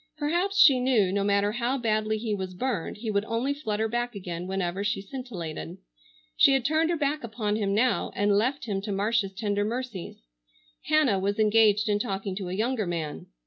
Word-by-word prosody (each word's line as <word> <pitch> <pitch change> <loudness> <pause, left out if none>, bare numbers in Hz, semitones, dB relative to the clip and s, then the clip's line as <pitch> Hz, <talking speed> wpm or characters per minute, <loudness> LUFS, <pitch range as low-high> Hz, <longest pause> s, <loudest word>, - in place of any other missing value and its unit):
Perhaps 345 +7 0
she 275 -8 +7
knew, 240 -7 +2
no 200 0 0
matter 200 0 +2
how 240 +4 -1
badly 215 -2 0
he 215 -1 -2
was 190 -2 -4
burned 240 -6 -2
he 220 0 -3
would 200 0 +1
only 235 +5 -1
flutter 220 -6 -2
back 240 +1 -2
again 180 -2 -5
whenever 190 0 -2
she 210 -1 0
scintillated. 195 - -7 0.6
She 275 - +6
had 265 -2 +1
turned 315 +2 +2
her 345 - +1
back 295 0 -1
upon 215 -2 -2
him 200 -2 0
now, 245 +4 +1
and 205 0 +2
left 255 +6 0
him 200 -4 -2
to 205 +1 -5
Marcia's 200 0 0
tender 205 0 -1
mercies. 225 - -5 0.6
Hannah 295 -11 +3
was 200 +2 -1
engaged 215 0 +4
in 205 -1 +1
talking 195 -3 -3
to 190 -3 -4
a - - -4
younger 220 +1 -1
man. 165 -4 -4
215 Hz, 190 wpm, -27 LUFS, 195-250 Hz, 0.6 s, she